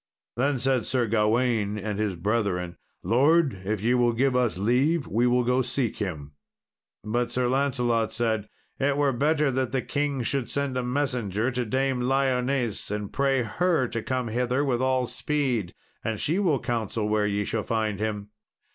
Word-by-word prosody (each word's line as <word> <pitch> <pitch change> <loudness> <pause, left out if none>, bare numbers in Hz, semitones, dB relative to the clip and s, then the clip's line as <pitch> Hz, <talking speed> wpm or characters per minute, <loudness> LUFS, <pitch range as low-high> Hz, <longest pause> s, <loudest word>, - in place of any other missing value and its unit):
Then 135 +3 +1
said 130 -2 0
Sir 125 -2 +1
Gawain 110 -1 +1
and 105 0 -3
his 105 -3 0
brethren, 90 -2 -1 0.3
"Lord, 135 - +3
if 105 +1 -2
ye 120 +2 +3
will 120 -1 +3
give 130 +2 +1
us 125 -6 +1
leave 130 - +2
we 120 +5 +1
will 125 0 +3
go 125 +2 +2
seek 125 -1 -1
him." 75 -8 -4 0.7
But 120 +3 -1
Sir 125 -1 0
Lancelot 125 -4 +1
said, 110 -3 -1 0.3
"It 140 +1 +1
were 145 -2 +2
better 150 +2 +2
that 130 -1 -1
the 130 -1 -1
king 145 -3 -1
should 135 +1 -1
send 140 -2 -1
a 125 - 0
messenger 125 -4 -1
to 125 -1 -2
Dame 130 +1 0
Lyones 130 -2 0
and 105 -1 -4
pray 135 -2 +2
her 160 - +1
to 115 -1 -3
come 130 -1 -2
hither 125 +4 0
with 125 -3 0
all 130 -1 +2
speed, 125 -9 -1 0.3
and 110 -2 -2
she 165 +6 0
will 165 -9 +2
counsel 115 -3 -2
where 105 -1 +1
ye 105 0 0
shall 110 - -1
find 110 -2 -1
him." 105 -1 -3
125 Hz, 175 wpm, -26 LUFS, 110-135 Hz, 0.7 s, Lord